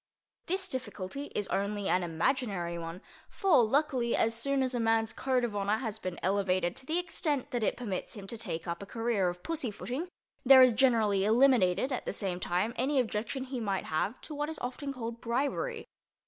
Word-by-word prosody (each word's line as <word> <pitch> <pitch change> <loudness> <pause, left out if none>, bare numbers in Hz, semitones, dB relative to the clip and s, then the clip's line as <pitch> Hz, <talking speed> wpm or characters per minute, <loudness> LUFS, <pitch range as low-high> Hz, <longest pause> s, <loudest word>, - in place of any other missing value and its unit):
This 375 +2 -1
difficulty 260 - -4
is 205 - -1
only 200 0 -1
an 180 - +3
imaginary 175 - -1
one—for, 185 - 0
luckily, 255 -1 +1
as 225 - +2
soon 270 +4 +1
as 255 0 -1
a 245 - 0
man's 225 -1 +2
code 260 -2 0
of 230 -3 -2
honor 205 +1 +1
has 220 -3 -4
been 185 -4 -5
elevated 185 -2 +1
to 260 - -9
the 320 - 0
extent 320 -6 -1
that 245 - -1
it 215 - 0
permits 205 -7 -4
him 200 -2 -8
to 215 - -5
take 175 -8 -4
up 170 +2 -3
a 200 - -8
career 225 -4 0
of 175 0 -8
pussy 310 -7 -2
footing 255 - -4 0.4
there 260 0 +9
is 255 -2 +6
generally 220 -5 +3
eliminated 230 -1 +4
at 255 - -2
the - - -1
same 185 -3 -2
time 185 +6 0
any 270 +3 +2
objection 230 +2 -2
he 260 -1 -5
might 200 -4 -1
have 195 +9 -1
to 310 - -8
what 295 +1 -2
is 320 - -5
often 270 +3 -4
called 235 -3 -6
bribery. 285 - -1
230 Hz, 195 wpm, -30 LUFS, 195-265 Hz, 0.4 s, there